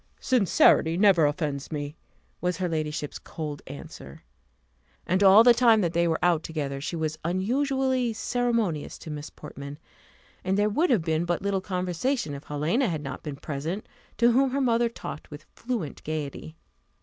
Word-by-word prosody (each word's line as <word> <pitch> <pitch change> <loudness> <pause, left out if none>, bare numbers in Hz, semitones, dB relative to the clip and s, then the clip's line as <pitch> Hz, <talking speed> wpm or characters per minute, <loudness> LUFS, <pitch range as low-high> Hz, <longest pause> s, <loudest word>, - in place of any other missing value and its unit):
"Sincerity 195 -8 +4
never 185 -6 +5
offends 145 -2 -3
me," 145 0 -4 0.5
was 180 0 0
her 185 - -1
ladyship's 155 -2 -3
cold 150 -3 -6
answer. 140 - -10 0.8
And 185 +3 +1
all 200 +3 +8
the 240 0 +8
time 235 -2 +5
that 170 -3 0
they 170 0 +2
were 160 -1 +1
out 175 -3 +3
together, 145 -4 -4
she 160 - -3
was 155 -1 -2
unusually 255 - 0
ceremonious 225 -8 -1
to 160 - -9
Miss 150 0 -6
Portman; 140 -1 -9 0.7
and 190 +1 0
there 205 +1 +3
would 315 - +1
have 220 -10 +3
been 160 0 0
but 175 +1 -1
little 200 -1 0
conversation, 185 - -2
if 140 +1 -8
Helena 160 - 0
had 155 -3 -3
not 140 - -6
been 150 -3 -6
present, 155 +8 -5 0.3
to 235 +2 +5
whom 265 +3 +3
her 275 +2 -1
mother 235 -2 +2
talked 190 -8 -8
with 150 +1 -10
fluent 230 - -4
gaiety. 155 0 -5
175 Hz, 165 wpm, -26 LUFS, 150-225 Hz, 0.8 s, all